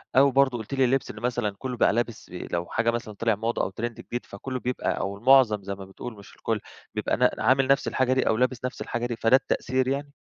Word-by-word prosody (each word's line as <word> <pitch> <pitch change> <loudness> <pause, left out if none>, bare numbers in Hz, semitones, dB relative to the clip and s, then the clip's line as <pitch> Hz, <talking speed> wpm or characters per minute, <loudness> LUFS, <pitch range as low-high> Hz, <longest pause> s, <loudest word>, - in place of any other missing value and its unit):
أو 140 +1 +6
برضو 130 -2 +3
قلت 110 +4 -7
لي 135 -1 +3
اللبس 130 +1 0
إنّه 105 - -11
مثلًا 120 -4 -1
كلّه 125 -2 -4
بقى - - +4
لابس 120 -1 -2
لو 85 -1 -4
حاجة 115 +4 +1
مثلًا 115 -2 -4
طلع 110 +1 +1
موضة 115 +3 -1
أو - - 0
ترند 115 +4 -5
جديد، 120 - -5
فكلّه 130 +6 -5
بيبقى 125 +1 -2
أو 100 0 -3
المعظم 120 -4 +5
زي 100 0 -4
ما 95 -1 -9
بتقول 110 +5 -8
مش 100 - -14
الكُلّ - - -2 0.4
بيبقى - - 0
ن - - +5
عامل 130 0 +4
نَفس 140 0 +3
الحاجة 130 0 +2
دي 130 - +1
أو 110 - +3
لابس 125 0 0
نَفس 125 - -5
الحاجة 120 0 -2
دي، 120 -1 -2
فده 115 +3 +4
التأثير 130 -1 0
يعني؟ 140 +1 -2
120 Hz, 240 wpm, -26 LUFS, 110-130 Hz, 0.4 s, أو